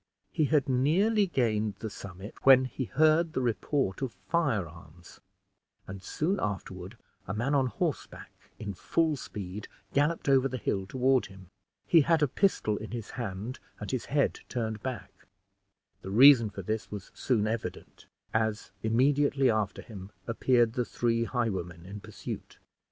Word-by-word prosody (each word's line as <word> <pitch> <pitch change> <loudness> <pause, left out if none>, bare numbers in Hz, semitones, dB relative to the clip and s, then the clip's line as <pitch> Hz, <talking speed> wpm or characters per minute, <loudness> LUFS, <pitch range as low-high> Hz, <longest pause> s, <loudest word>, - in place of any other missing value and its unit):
He 155 - +1
had 145 -2 +2
nearly 185 - +3
gained 110 - 0
the 110 +1 -6
summit 100 +1 -9
when 130 -1 +7
he 130 +1 -4
heard 155 +4 +3
the - - 0
report 120 -1 -1
of 120 -7 -4
firearms, 90 - -3 0.6
and 95 0 -8
soon 175 - -1
afterward 95 0 -4 0.3
a 95 - -3
man 120 +6 0
on 135 -2 +3
horseback, 115 - -4 0.3
in 105 -2 -5
full 160 - +1
speed, 100 -6 -7 0.3
galloped 150 +3 +1
over 135 -1 +4
the 130 -1 -4
hill 95 -4 -2
toward 130 +3 +2
him. 95 -2 -14 0.4
He 165 - +6
had 160 +1 +3
a - - +4
pistol 125 - +1
in 110 - -7
his 115 -3 -6
hand, 115 +1 -5 0.2
and - - -5
his 130 -3 -2
head 140 0 +1
turned 110 -4 -3
back. 130 -3 -5 0.9
The 95 - -7
reason 120 +1 +7
for 100 -1 -7
this 110 +4 -3
was 100 -3 -8
soon 115 -5 +1
evident, 110 +1 -5 0.3
as 110 -2 -1
immediately 135 +3 +3
after 110 -2 -1
him 100 -4 -9 0.2
appeared 120 0 +2
the 125 -1 0
three 115 -1 0
highwaymen 95 -9 -3
in 100 +2 -8
pursuit. - - -8
115 Hz, 150 wpm, -29 LUFS, 100-135 Hz, 0.9 s, when